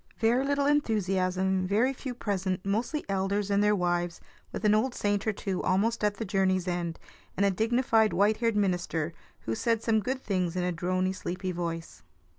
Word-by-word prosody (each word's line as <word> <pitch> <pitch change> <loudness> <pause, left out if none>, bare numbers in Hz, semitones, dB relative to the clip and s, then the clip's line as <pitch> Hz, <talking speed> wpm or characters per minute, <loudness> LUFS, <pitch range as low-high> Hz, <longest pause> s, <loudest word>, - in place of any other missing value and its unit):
Very 235 +4 +2
little 280 0 +1
enthusiasm, 190 -8 +1
very 225 +7 +2
few 255 -1 -6
present, 190 -4 -2
mostly 230 +10 -1
elders 195 +1 -1
and 200 +1 +3
their 210 0 +4
wives, 175 -2 -1 0.3
with 215 - -4
an 210 - +5
old 240 +4 +1
saint 205 0 0
or - - +4
two 195 -2 -3
almost 210 +5 +1
at 210 -1 +2
the 220 - -4
journey's 190 -2 +1
end, 175 -2 -2 0.4
and 200 - +3
a 200 - +3
dignified 225 +1 +2
white 210 +2 +3
haired 230 -2 +1
minister, 175 -5 0 0.3
who 115 - -3
said 230 - 0
some 220 -1 +3
good 260 +4 -2
things 185 -4 -1
in 180 - 0
a 180 0 0
drony, 185 +2 0
sleepy 185 0 -4
tone. 170 -1 -3
200 Hz, 185 wpm, -28 LUFS, 185-220 Hz, 0.4 s, an